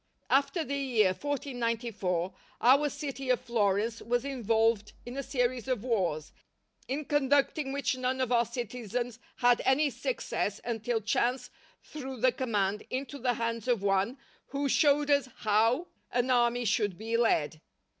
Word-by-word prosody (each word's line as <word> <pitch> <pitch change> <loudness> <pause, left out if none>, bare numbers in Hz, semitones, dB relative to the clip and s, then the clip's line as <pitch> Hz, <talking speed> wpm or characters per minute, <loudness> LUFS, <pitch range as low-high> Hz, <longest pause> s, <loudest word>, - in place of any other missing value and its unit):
After 280 +5 +2
the 280 -1 -3
year 245 -8 +2
1494 230 - -2 0.3
our 280 +4 +5
city 275 -2 -5
of 250 - +3
Florence 220 -1 0
was 245 +2 -1
involved 225 -4 +1
in 245 +1 -7
a 275 - -2
series 250 -2 -1
of 250 -5 -1
wars, 180 -11 -1 0.6
in 285 +3 -3
conducting 285 0 +1
which 275 -2 0
none 255 +1 -1
of 255 -2 0
our 240 -1 +4
citizens 240 0 -4 0.2
had 245 -1 +3
any 285 +2 +3
success 235 - -2
until 230 0 -1
chance 240 +4 0 0.3
threw 265 -4 -7
the 255 +2 +4
command 210 -6 -1
into 275 +2 -4
the 245 0 +1
hands 230 0 -3
of 235 -5 +1
one 200 +5 +1 0.3
who 280 +1 -2
showed 290 +1 +3
us 280 -3 +3
how 225 +9 +2 0.3
an 245 +1 +1
army 240 0 +2
should 205 -3 +1
be 225 +2 -3
led. 160 -10 +1
245 Hz, 145 wpm, -30 LUFS, 220-270 Hz, 0.6 s, our